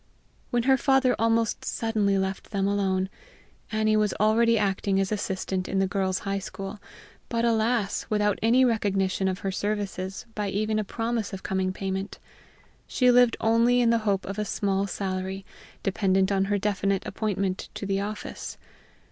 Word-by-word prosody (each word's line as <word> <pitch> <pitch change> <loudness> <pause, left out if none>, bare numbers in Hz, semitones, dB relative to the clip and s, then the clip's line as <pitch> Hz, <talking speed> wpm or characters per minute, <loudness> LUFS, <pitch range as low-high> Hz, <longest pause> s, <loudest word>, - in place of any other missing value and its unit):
When 240 -1 +1
her 265 +1 +4
father 265 -1 +3
almost 225 0 +1
suddenly 215 -3 0
left 190 0 -3
them 195 -2 0
alone, 190 -2 +1 0.6
Annie 215 0 +2
was 210 -2 +1
already 225 +2 +4
acting 195 -1 +1
as 195 +1 0
assistant 190 -2 -2
in 195 - -1
the 195 - +3
Girls' 190 -1 0
High 195 0 -1
School 195 +1 -7 0.5
but, 230 0 0
alas! 225 -2 +1
without 210 -1 +1
any 245 +4 +5
recognition 195 -4 +1
of 190 0 -2
her 195 - +1
services 195 0 -3
by 210 -2 -2
even 215 +2 0
a - - 0
promise 225 0 -2
of 190 - -6
coming 190 -1 0
payment. 190 +1 -4 0.7
She 250 -1 +3
lived 245 -1 +5
only 230 +2 +3
in 235 -1 +4
the 230 - +3
hope 200 -3 0
of 200 +2 -5
a - - +1
small 200 -1 0
salary, 190 0 -3 0.4
dependent 195 -1 +2
on 195 -1 +2
her 205 +1 +1
definite 195 -1 0
appointment 195 -2 -2
to - - -5
the 195 0 0
office. 210 +1 -6
200 Hz, 165 wpm, -26 LUFS, 195-225 Hz, 0.7 s, any